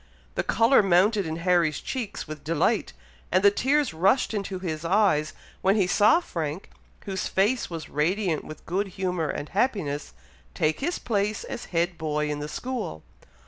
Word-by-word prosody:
The - - 0
colour 230 +3 +4
mounted 195 +1 +3
into 160 +1 -4
Harry's 170 -4 +2
cheeks 235 -10 -5
with 155 -1 -8
delight, 160 - +1 0.4
and 185 +2 +3
the 200 - +7
tears 275 - +1
rushed 195 +10 +2
into 200 -2 -3
his 165 -4 -4
eyes, 165 -4 +2 0.3
when 195 +2 +3
he 200 -4 +3
saw 210 - +5
Frank, 165 - -5 0.3
whose 190 -2 -2
face 215 +6 +1
was 165 -2 -6
radiant 170 +3 0
with 155 - -10
good 195 +4 -1
humour 180 -4 -1
and 145 - -4
happiness, 180 - -1 0.4
take 155 0 +1
his 345 +5 -1
place 210 -2 -1
as - - -6
head 170 0 -1
boy 150 -1 -1
in 145 - -3
the 150 +1 -5
school. 240 - -4
185 Hz, 165 wpm, -26 LUFS, 155-210 Hz, 0.4 s, the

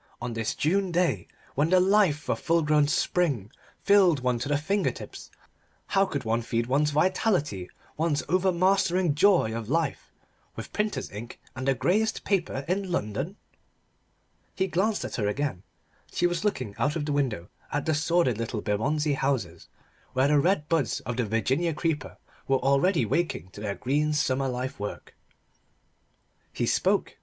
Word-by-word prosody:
On 120 0 -4
this 115 -1 -2
June 190 +4 +1
day, 170 - +1 0.3
when 145 +4 +1
the 185 +1 +5
life 185 -6 +3
of - - 0
full 165 0 +2
grown 150 -1 +3
spring 145 - 0 0.3
thrilled 190 -8 +5
one 125 -1 0
to 135 - -3
the 145 - +2
finger 195 +7 0
tips, - - -9 0.6
how 195 0 +3
could 145 -7 -3
one 115 +1 0
feed 115 0 -1
one's 140 +4 +2
vitality, 150 - 0 0.3
one's 155 -2 0
over 185 +4 +2
mastering 185 -2 +2
joy 165 - +4
of 115 -1 -5
life, 160 0 -1 0.4
with - - -8
printer's 210 0 -2
ink 110 +4 -8 0.2
and 130 +1 -4
the 135 - +3
greyest 185 - +1
paper 170 -8 -1
in 190 +1 -1
London? 135 - -2 1.2
He 190 - +1
glanced 195 +4 0
at - - -5
her 105 -4 0
again. 130 -4 -2 0.5
She - - 0
was 175 0 0
looking 130 - -1
out 145 +2 +1
of 155 -3 -2
the 145 - -1
window 120 -12 -1 0.2
at 145 -1 -1
the 160 - +1
sordid 155 -6 +1
little 115 -1 -3
Bermondsey 145 +10 0
houses, 130 -12 -2 0.5
where 130 +2 +3
the 150 -1 +4
red 150 -1 +1
buds 160 -7 0
of 120 +1 -4
the 120 -3 0
Virginia 135 +10 0
creeper 155 -4 -2 0.3
were 135 - +3
already 140 - +2
waking 135 - -1
to 100 - -10
their 100 -1 -3
green 150 +4 0
summer 135 -3 +1
life 130 0 -4
work. 105 0 -6 1.4
He - - -1
spoke. - - +1
145 Hz, 165 wpm, -27 LUFS, 125-175 Hz, 1.4 s, the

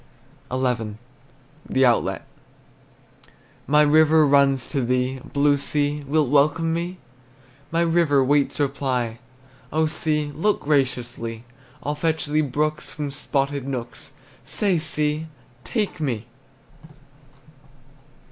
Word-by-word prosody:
XI. 125 -5 -1 0.7
THE 130 0 +3
OUTLET. 120 -2 +1 1.4
My 150 +1 +5
river 155 +1 +5
runs 140 -3 +3
to 140 - 0
thee: 125 +2 0
Blue 145 +1 +1
sea, 145 +1 -1
wilt 150 -1 +2
welcome 150 +3 +3
me? 175 +2 -3 0.7
My 165 +1 +1
river 165 -5 +3
waits 145 +2 +1
reply. 130 -5 -1 0.5
Oh 160 +1 +2
sea, 150 -1 0
look 200 +8 0
graciously! 120 -5 -1 0.4
I'll 145 - -1
fetch 160 +1 -1
thee 150 +1 +1
brooks 150 +2 -1
From 145 -2 -5
spotted 140 -1 -1
nooks, 125 -3 -6 0.3
Say, 195 -5 +1
sea, 155 0 -1 0.4
Take 210 -7 -2
me! 120 -7 -2
145 Hz, 105 wpm, -23 LUFS, 130-155 Hz, 1.4 s, My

